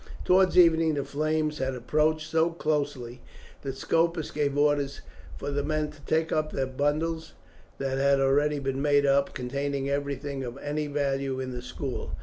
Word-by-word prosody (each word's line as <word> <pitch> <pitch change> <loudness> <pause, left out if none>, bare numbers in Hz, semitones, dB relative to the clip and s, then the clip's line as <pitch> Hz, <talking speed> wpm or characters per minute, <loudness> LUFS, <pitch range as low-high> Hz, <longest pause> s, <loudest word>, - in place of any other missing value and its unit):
Towards 185 0 +4
evening 165 -3 +5
the 140 - -1
flames 155 +1 -1
had 130 0 -1
approached 155 +5 +1
so 160 +1 +2
closely, 145 -7 -2 0.4
that 135 -1 -5
Scopus 165 +3 0
gave 145 -2 -1
orders 145 -1 +1 0.4
for 145 - -4
the 145 0 0
men 155 0 -1
to 150 -1 -17
take 160 +1 +1
up 155 0 0
the 135 - -1
bundles 150 +5 -1 0.4
that 135 -1 -2
had 140 0 +4
already 145 +2 +2
been 135 -1 -2
made 145 -1 +3
up, 140 0 +2
containing 140 +2 -2
everything 140 -1 -3
of 120 +1 -6
any 150 +1 -3
value 140 -2 -1
in 130 -1 -4
the 125 -1 -5
school. 125 +2 -5
145 Hz, 165 wpm, -27 LUFS, 135-155 Hz, 0.4 s, evening